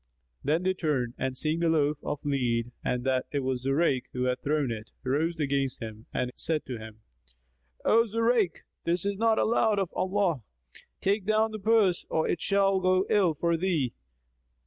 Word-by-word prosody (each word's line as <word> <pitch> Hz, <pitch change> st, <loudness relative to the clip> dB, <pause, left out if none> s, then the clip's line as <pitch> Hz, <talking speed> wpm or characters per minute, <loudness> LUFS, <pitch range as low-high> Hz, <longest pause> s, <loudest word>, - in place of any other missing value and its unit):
Then 155 Hz, +5 st, +1 dB
they 185 Hz, 0 st, +2 dB
turned 145 Hz, -9 st, -1 dB
and 130 Hz, -1 st, -2 dB
seeing 155 Hz, +3 st, 0 dB
the 170 Hz, -1 st, +2 dB
loaf 150 Hz, -2 st, +2 dB
of 145 Hz, -, -4 dB
lead 120 Hz, -4 st, 0 dB
and 125 Hz, 0 st, -1 dB
that 130 Hz, -1 st, 0 dB
it 145 Hz, -, 0 dB
was 130 Hz, -1 st, -1 dB
Zurayk 135 Hz, -1 st, +1 dB
who 125 Hz, -, -1 dB
had 125 Hz, 0 st, 0 dB
thrown 145 Hz, -3 st, 0 dB
it, 110 Hz, -1 st, -6 dB
rose 155 Hz, +6 st, 0 dB
against 140 Hz, -3 st, 0 dB
him 110 Hz, -1 st, -8 dB
and 125 Hz, 0 st, -1 dB
said 160 Hz, -2 st, -2 dB
to 125 Hz, -3 st, -5 dB
him, 110 Hz, 0 st, -11 dB, 0.8 s
"O 230 Hz, +1 st, +5 dB
Zurayk, 230 Hz, -4 st, +1 dB, 0.2 s
this 170 Hz, +2 st, 0 dB
is 200 Hz, -1 st, -1 dB
not 225 Hz, -1 st, +3 dB
allowed 220 Hz, -2 st, +2 dB
of 195 Hz, -3 st, -1 dB
Allah! 185 Hz, -7 st, 0 dB, 0.6 s
Take 200 Hz, 0 st, 0 dB
down 220 Hz, +1 st, +3 dB
the 215 Hz, -, -5 dB
purse 205 Hz, -4 st, +2 dB
or 160 Hz, -, +1 dB
it 165 Hz, -, -1 dB
shall 195 Hz, -1 st, +2 dB
go 185 Hz, +1 st, +2 dB
ill 185 Hz, -6 st, +3 dB
for 170 Hz, +3 st, +1 dB
thee." 165 Hz, -8 st, 0 dB
160 Hz, 180 wpm, -28 LUFS, 130-195 Hz, 0.8 s, O